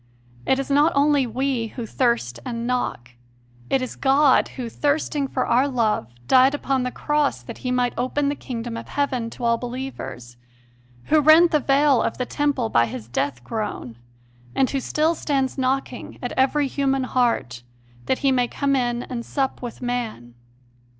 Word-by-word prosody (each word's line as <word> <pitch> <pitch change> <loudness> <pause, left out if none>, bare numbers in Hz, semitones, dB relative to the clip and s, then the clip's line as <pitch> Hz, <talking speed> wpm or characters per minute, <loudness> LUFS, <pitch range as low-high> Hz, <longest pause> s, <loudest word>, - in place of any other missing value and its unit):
It 265 - +3
is 275 +1 -3
not 295 +4 +4
only 285 -2 +3
we 250 0 -1
who 230 +2 -6
thirst 220 - 0
and 235 -1 -4
knock: 240 - -2 0.6
it 265 - +1
is 255 - -5
God 275 0 +4
Who, 250 -2 -4
thirsting 290 +2 0
for 255 -1 -1
our 255 +4 +3
love, 225 - 0 0.2
died 260 +2 +5
upon 270 -2 -1
the 250 - -1
cross 295 - -1
that - - -9
He 250 - -4
might 250 -1 +1
open 280 +3 0
the 285 - +1
kingdom 235 -4 -6
of - - -8
heaven 255 -5 -1
to 240 - -10
all 235 -1 +2
believers, 240 - -7 0.7
Who 310 -1 +3
rent 315 +3 +7
the 300 - +3
veil 275 -1 +3
of - - -2
the 250 - -2
Temple 280 -4 0
by 115 - +3
His 115 -1 -7
death 125 0 -2
groan, 205 - -4 0.6
and 265 - +3
Who 275 - 0
still 310 +5 +1
stands 275 -5 -1
knocking 260 -1 -2
at 245 - -3
every 275 +3 +2
human 270 0 0
heart, 235 - 0 0.5
that 260 - +2
He 270 - +5
may 250 -2 +2
come 275 +3 0
in 240 -2 0
and 240 -2 -5
sup 270 +2 -2
with 245 0 -7
man. 230 - -4
255 Hz, 175 wpm, -23 LUFS, 235-275 Hz, 0.7 s, rent